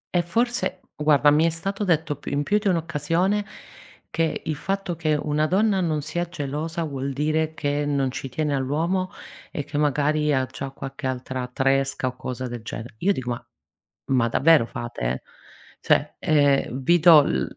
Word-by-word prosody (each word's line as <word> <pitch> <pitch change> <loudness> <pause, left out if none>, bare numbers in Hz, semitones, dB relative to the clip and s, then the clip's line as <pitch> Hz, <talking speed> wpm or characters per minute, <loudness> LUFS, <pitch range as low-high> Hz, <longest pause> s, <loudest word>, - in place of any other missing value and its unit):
E 175 - +5
forse 185 +1 -1
guarda 150 -1 +4
mi 155 +2 +4
è - - +4
stato 195 +5 -3
detto 160 -5 +1
più, 145 - -7
in 145 +1 0
più 210 +7 +2
di 205 - -2
un'occasione 170 +4 +1 0.7
che 165 -1 0
il 155 - -1
fatto 195 +1 -3
che 155 -2 0
una 150 +1 0
donna 195 +1 +2
non 155 -4 -1
sia 175 +2 -3
gelosa 160 +2 -3
vuol 140 -2 -3
dire 155 +2 0
che 145 0 -1
non 135 -3 0
ci 135 - -5
tiene 150 +3 -1
all'uomo 165 +8 0 0.4
e 145 - -4
che 145 +1 -4
magari 150 +1 +2
ha 130 -2 +2
già 135 +1 -6
qualche 135 0 -6
altra 130 0 -3
tresca 135 0 +1
o 125 - -11
cosa 130 0 -5
del 120 -2 -6
genere. 115 +1 -7
Io 200 - +2
dico: 125 -8 -2
"Ma 120 0 -4 0.7
ma 120 -3 +3
davvero 150 0 +5
fate?". 65 - -4 0.6
Cioè - - +2
ehm 140 -3 +2
vi 175 +4 +4
do 155 -2 +8
l - - -1
150 Hz, 175 wpm, -24 LUFS, 135-165 Hz, 0.7 s, do